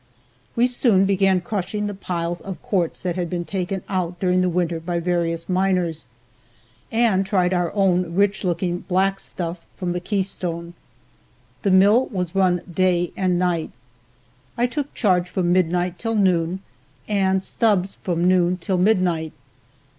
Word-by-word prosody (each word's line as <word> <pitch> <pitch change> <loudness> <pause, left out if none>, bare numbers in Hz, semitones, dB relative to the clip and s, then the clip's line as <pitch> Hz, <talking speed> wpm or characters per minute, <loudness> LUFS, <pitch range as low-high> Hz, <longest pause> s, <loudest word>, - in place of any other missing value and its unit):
We 235 0 +4
soon 235 -6 +3
began 195 -1 +2
crushing 205 +2 -3
the 205 - -3
piles 175 -3 -3
of 190 -2 -7
quartz 180 -5 -1
that 180 -2 -1
had 175 -2 -2
been 175 0 -3
taken 190 0 -3
out 180 -2 -2
during 185 -1 +2
the 185 - +2
winter 170 -1 -1
by 170 +1 -2
various 170 -1 -1
miners, 180 -5 0 0.9
and 225 -4 +3
tried 185 -2 +1
our 175 -2 0
own 180 -4 +1
rich 200 0 +2
looking 175 -1 -1
black 195 +2 0
stuff 170 -1 -5
from 180 -2 -2
the 175 - -2
Keystone. 175 -3 -3 0.9
The 200 - +1
mill 200 +7 +5
was 180 -4 -3
run 185 -3 +2
day 175 -1 +2
and 185 -2 +1
night. 175 -2 0 0.9
I 240 - +3
took 285 +3 -3
charge 180 -5 +2
from 175 -1 +1
midnight 180 0 +1
till 225 -1 -2
noon 185 -2 +1 0.4
and 190 -2 +1
Stubbs 200 -5 0
from 175 -1 0
noon 180 -1 +3
till 185 +1 -1
midnight. 180 -5 +1
185 Hz, 150 wpm, -22 LUFS, 175-195 Hz, 0.9 s, mill